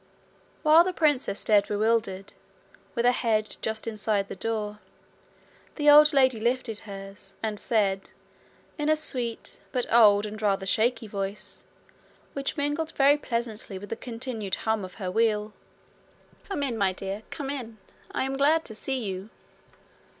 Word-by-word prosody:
While 315 +2 +7
the 370 +1 -2
princess 290 - +1
stared 205 -2 +3
bewildered, 210 -2 0 0.6
with 235 -1 +1
her 245 - +6
head 220 -3 0
just 220 0 -3
inside 210 -2 -1
the - - -5
door, 210 0 -3 1.0
the 295 -1 +5
old 300 +1 +8
lady 260 -5 +4
lifted 235 -1 -1
hers, 195 0 -10
and 215 -2 -2
said, 195 -4 0 0.7
in 295 +1 0
a 310 - +5
sweet, 250 -7 -2
but 250 -1 -1
old 210 -3 +6
and 215 +1 -7
rather 195 -2 +1
shaky 225 +5 +1
voice, 200 -1 -5 0.7
which 275 +2 -3
mingled 295 +3 -1
very 280 +1 +5
pleasantly 230 -7 -4
with 205 +2 -9
the - - -1
continued 230 -4 -4
hum 220 -2 +1
of 185 - -8
her 185 -4 -4
wheel: 215 0 +1 1.0
'Come 340 -8 -2
in, 240 -5 -2
my 195 -2 +2
dear; 195 +2 -5
come 280 -2 -4
in. 235 -6 -6 0.3
I - - -1
am 270 +1 -2
glad 310 +4 +3
to 220 - -7
see 255 +3 -3
you.' 190 0 -5
225 Hz, 150 wpm, -27 LUFS, 205-265 Hz, 1.0 s, old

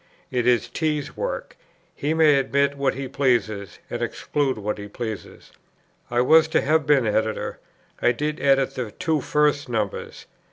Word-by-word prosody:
It 125 -1 0
is 120 -1 +3
T.'s 150 +3 -2
work; - - -4 0.4
he 150 +3 -1
may 155 -3 +5
admit 140 +1 +1
what 140 -2 0
he 135 0 -4
pleases; 120 -7 0
and - - -5
exclude 140 -4 -1
what 105 0 -3
he 100 - -7
pleases. 110 0 -7 0.6
I 120 0 +2
was 160 +5 +6
to 160 - +2
have 155 +1 +1
been 140 -4 +4
Editor. 110 0 -1 0.4
I 120 - +4
did 150 +5 -3
edit 135 -1 +3
the 125 -4 -4
two 160 - -1
first 145 -1 +1
numbers. 110 -4 -3
135 Hz, 160 wpm, -23 LUFS, 120-150 Hz, 0.6 s, was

